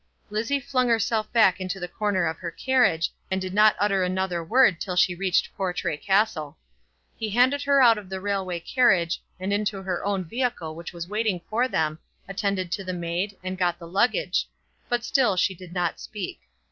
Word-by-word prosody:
Lizzie 225 +7 0
flung 255 -1 0
herself 225 -1 +1
back 205 -5 +4
into 185 +1 -3
the 180 - -4
corner 200 -2 0
of 160 0 -2
her 175 - -4
carriage, 245 -6 +2 0.2
and 190 0 0
did 185 0 -5
not 215 +1 +5
utter 200 -2 +2
another 180 -1 -1
word 200 -1 +4
till 185 -2 -3
she 180 0 +4
reached 185 0 0
Portray 180 -4 -2
Castle. 190 -4 0 0.6
He 220 - -3
handed 255 +6 +3
her 280 -1 +4
out 230 -3 +6
of 195 -3 -13
the 190 0 -4
railway 190 -3 -2
carriage, 190 -6 +2 0.2
and 190 +2 -2
into 205 -1 -1
her 185 -2 -3
own 200 -2 0
vehicle 225 -4 -2
which 170 +1 -8
was 170 -1 -7
waiting 210 -2 0
for 240 +4 +2
them, 155 -8 -1 0.3
attended 195 -2 -2
to 195 - -2
the 185 -1 -4
maid, 175 +3 -3
and 185 0 -4
got 175 -1 +1
the 170 -1 -10
luggage; 240 - +1 0.4
but 240 -1 0
still 250 -9 +2
she 190 +2 +2
did 180 -1 -12
not 175 -2 -1
speak. 205 -4 -6
190 Hz, 190 wpm, -25 LUFS, 180-215 Hz, 0.6 s, out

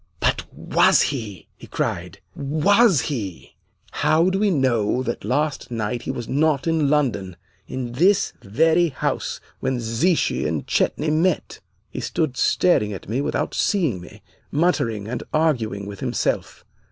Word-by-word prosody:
'But - - 0
was - - +3
he?' 105 - -7
he - - -12
cried. - - -3 0.2
'Was 160 - +3
he? 105 - -5 0.4
How 160 +4 +2
do 195 - 0
we 210 0 +3
know 130 - +1
that 120 -2 -4
last 145 +7 -1
night 115 0 -2
he - - -7
was 120 -3 -4
not 145 0 +1
in 160 -3 +2
London, 120 -11 0 0.3
in 125 -2 -4
this 180 +10 +3
very 160 - +3
house 130 - -2 0.2
when 130 -2 -1
Zichy 120 +10 +1
and - - -2
Chetney 155 +1 0
met?' 165 +2 0 0.3
"He - - -5
stood 155 -6 -1
staring 110 -5 +2
at 95 - -9
me 120 +7 -1
without - - -2
seeing 160 - +1
me, 90 - -13 0.3
muttering, 115 - 0
and 120 +1 -4
arguing 120 -11 0
with 100 -1 -8
himself. - - -2
135 Hz, 145 wpm, -22 LUFS, 115-160 Hz, 0.4 s, was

